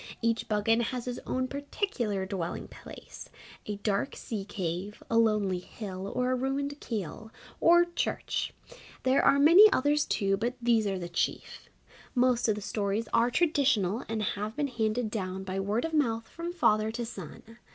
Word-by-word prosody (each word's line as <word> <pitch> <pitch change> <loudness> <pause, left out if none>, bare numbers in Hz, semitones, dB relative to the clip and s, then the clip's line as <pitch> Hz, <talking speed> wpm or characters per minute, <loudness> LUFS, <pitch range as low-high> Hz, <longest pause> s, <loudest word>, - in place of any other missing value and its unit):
Each 230 0 0
Buggane 220 +2 +2
has 245 +1 -3
his 250 -1 -4
own 255 0 -1
particular 275 - -2
dwelling 185 -3 -4
place - - -11 0.4
a 210 - -2
dark 205 +5 -1
sea 220 -6 -5
cave, 190 0 -4
a 230 - +3
lonely 210 -5 +2
hill, 190 0 -7
or 250 0 +1
a - - +2
ruined 275 +2 -2
Keeill, 215 -1 -5 0.3
or 345 +1 +6
Church. 345 - -2 0.5
There 260 +1 +4
are 280 - +5
many 345 +9 +8
others 290 +2 +2
too, 195 -2 +1
but 240 +4 -2
these 230 -3 +2
are 195 -1 -1
the 175 -1 -5
chief. 175 - -3 0.5
Most 250 -1 +3
of 215 - +2
the 210 - -6
stories 205 +2 -2
are 235 +1 +4
traditional 255 - +2
and 220 -1 -1
have 210 +2 -3
been 290 -1 -1
handed 220 -1 -1
down 190 -3 -3
by 190 0 -3
word 205 +6 0
of 325 - -4
mouth 230 -7 +1
from 335 +1 -6
father 215 -11 +2
to 235 0 -3
son. 225 +2 -10
225 Hz, 170 wpm, -29 LUFS, 200-255 Hz, 0.5 s, many